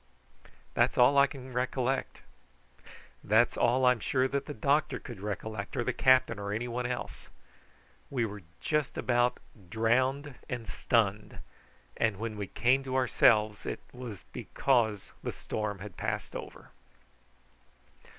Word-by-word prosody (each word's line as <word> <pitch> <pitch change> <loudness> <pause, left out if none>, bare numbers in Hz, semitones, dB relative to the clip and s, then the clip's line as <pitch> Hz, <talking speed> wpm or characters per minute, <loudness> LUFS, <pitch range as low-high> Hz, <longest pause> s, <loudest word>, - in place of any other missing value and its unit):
That's - - +2
all 125 +3 +6
I 140 0 +6
can 130 -2 -10
recollect. 130 +1 -1 1.0
That's 110 +3 +3
all 130 +2 +3
I'm 125 -2 +4
sure 130 +3 +1
that 140 0 -2
the 145 - -4
doctor 140 +5 +1
could 120 -5 -9
recollect, 105 0 -5
or 120 - +1
the - - -1
captain 130 -4 +4
or 100 0 -4
anybody 120 +3 -2
else. 125 -1 -5 0.8
We 125 -4 0
were 105 -1 -7 0.2
just 150 -3 -1
about 120 0 +2 0.3
drowned 130 - +1 0.2
and 120 -3 -4
stunned, 105 -2 0 0.6
and 110 -3 +1
when 110 +1 -4
we 100 -1 -4
came 130 +6 +2
to 130 0 -3
ourselves 110 -4 +3
it - - -4
was 125 -6 -8
because 115 -7 0
the - - -3
storm 105 -2 -4
had 95 -5 -10
passed - - -3
over. - - -8
120 Hz, 135 wpm, -30 LUFS, 110-130 Hz, 1.0 s, all